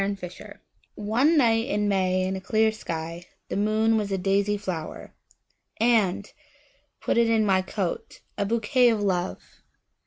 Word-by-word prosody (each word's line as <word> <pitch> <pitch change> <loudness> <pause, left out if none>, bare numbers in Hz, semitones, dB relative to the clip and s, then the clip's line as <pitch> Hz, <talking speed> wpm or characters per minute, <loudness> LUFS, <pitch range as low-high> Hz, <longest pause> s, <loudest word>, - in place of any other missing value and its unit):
My 200 +1 -1
Flower 180 -2 -10 0.3
ONE 245 +10 +2
night 230 -4 +3
in 210 0 0
May 185 -2 +1
in 190 +1 -2
a 190 - -5
clear 220 +3 +2
skyThe 170 -4 -7
moon 215 +2 +2
was 205 -2 -2
a 195 - 0
daisy 200 +2 +1
flower:And! 200 +3 -3 0.7
put - - 0
it 230 -1 +3
in 220 -1 +3
my 190 -2 +3
coat,A 190 +1 -5
bouquet 235 +3 +3
of 220 -3 0
Love! 185 -2 -3
205 Hz, 135 wpm, -25 LUFS, 185-220 Hz, 0.7 s, night